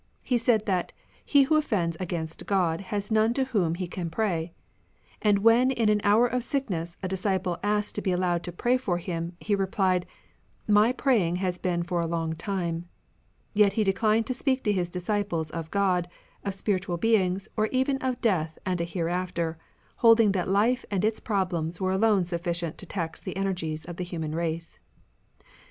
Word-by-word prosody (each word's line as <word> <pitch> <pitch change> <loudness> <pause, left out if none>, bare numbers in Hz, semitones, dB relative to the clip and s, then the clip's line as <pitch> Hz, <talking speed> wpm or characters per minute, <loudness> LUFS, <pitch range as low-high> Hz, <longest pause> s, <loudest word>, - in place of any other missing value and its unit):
He 245 -3 +1
said 225 -2 +2
that 185 -4 -1 0.2
" - - -31
he 285 -1 +5
who 310 +3 +3
offends 195 - 0
against 165 -3 -4
God 180 -4 +1
has 205 +2 -4
none 220 +2 +3
to 270 - +2
whom 200 -11 0
he 180 +1 -3
can 175 -1 -5
pray; 170 -3 -1 0.4
" - - -33
and 205 -2 +4
when 235 +3 +6
in 235 -5 +2
an 210 -1 +3
hour 215 +4 +5
of 245 0 -1
sickness 185 - -3
a - - 0
disciple 185 -2 -1
asked 210 0 0
to - - -3
be 190 - 0
allowed 180 -1 +1
to 175 - -4
pray 240 +8 +1
for 200 -9 -1
him, 170 -1 -4
he 210 - -1
replied, 190 -2 +1 0.3
" - - -37
My 225 +3 +4
praying 235 - +2
has 180 -1 -2
been 175 -2 0
for 175 0 -1
a 165 - -1
long 165 -1 -1
time." 170 -1 -3 0.6
Yet 205 -2 +4
he 220 - +2
declined 215 +3 +2
to 255 - -1
speak 260 0 0
to 210 - +2
his 180 -3 -1
disciples 180 -3 -2
of 165 -1 -5
God, 185 -3 +1 0.4
of 200 -1 -3
spiritual 190 -3 -1
beings 190 -2 +1
or 215 0 +2
even 265 +3 +1
of 260 -2 -2
death 165 -9 +1
and 180 -2 0
a - - 0
hereafter, 170 -1 -2 0.4
holding 230 -3 +6
that 185 -2 -1
life 225 +6 +2
and 200 0 0
its 220 0 0
problems 180 -5 -1
were 185 -1 0
alone 195 -1 +3
sufficient 170 -1 -3
to 190 - -7
tax 165 -4 -4
the 190 - -6
energies 165 -5 -2
of 175 -1 -8
the 180 - -2
human 160 -3 -4
race. 165 0 -3
190 Hz, 190 wpm, -27 LUFS, 170-215 Hz, 0.6 s, when